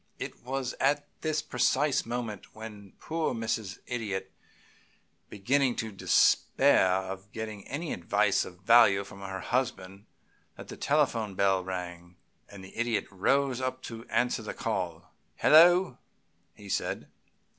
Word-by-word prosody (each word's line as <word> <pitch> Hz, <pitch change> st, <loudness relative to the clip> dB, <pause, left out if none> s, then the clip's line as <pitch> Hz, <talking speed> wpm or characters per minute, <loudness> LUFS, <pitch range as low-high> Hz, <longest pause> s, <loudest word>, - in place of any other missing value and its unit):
It -, -, -7 dB
was 130 Hz, 0 st, -3 dB
at 145 Hz, +2 st, +1 dB
this 155 Hz, -1 st, -1 dB
precise 130 Hz, +2 st, +1 dB
moment, 115 Hz, -4 st, -5 dB
when 105 Hz, -3 st, -10 dB
poor 160 Hz, -5 st, -2 dB
Mrs. 110 Hz, -3 st, -3 dB
Idiot 100 Hz, -6 st, -4 dB
was -, -, -34 dB
beginning 125 Hz, +5 st, +1 dB
to 110 Hz, -3 st, -4 dB
despair 95 Hz, -1 st, +3 dB
of 95 Hz, +2 st, -3 dB
getting 110 Hz, -3 st, -7 dB
any 155 Hz, +4 st, -4 dB
advice 100 Hz, +3 st, +1 dB
of 90 Hz, 0 st, -11 dB
value 105 Hz, -2 st, +6 dB
from 100 Hz, 0 st, -12 dB
her 95 Hz, -1 st, -5 dB
husband, 110 Hz, -6 st, -3 dB, 0.5 s
that -, -, -10 dB
the -, -, -7 dB
telephone 120 Hz, -9 st, 0 dB
bell 95 Hz, -1 st, +2 dB
rang, 90 Hz, -1 st, -7 dB, 0.3 s
and 100 Hz, -2 st, -11 dB
the 95 Hz, -, -14 dB
Idiot 120 Hz, -2 st, 0 dB
rose 130 Hz, +6 st, +1 dB
up 130 Hz, 0 st, -3 dB
to 115 Hz, -1 st, -7 dB
answer 125 Hz, 0 st, +1 dB
the -, -, -6 dB
call. -, -, -4 dB, 0.2 s
"Hello!" 175 Hz, -1 st, +6 dB, 0.6 s
he 105 Hz, -2 st, -13 dB
said. -, -, -2 dB
110 Hz, 135 wpm, -29 LUFS, 95-130 Hz, 0.6 s, value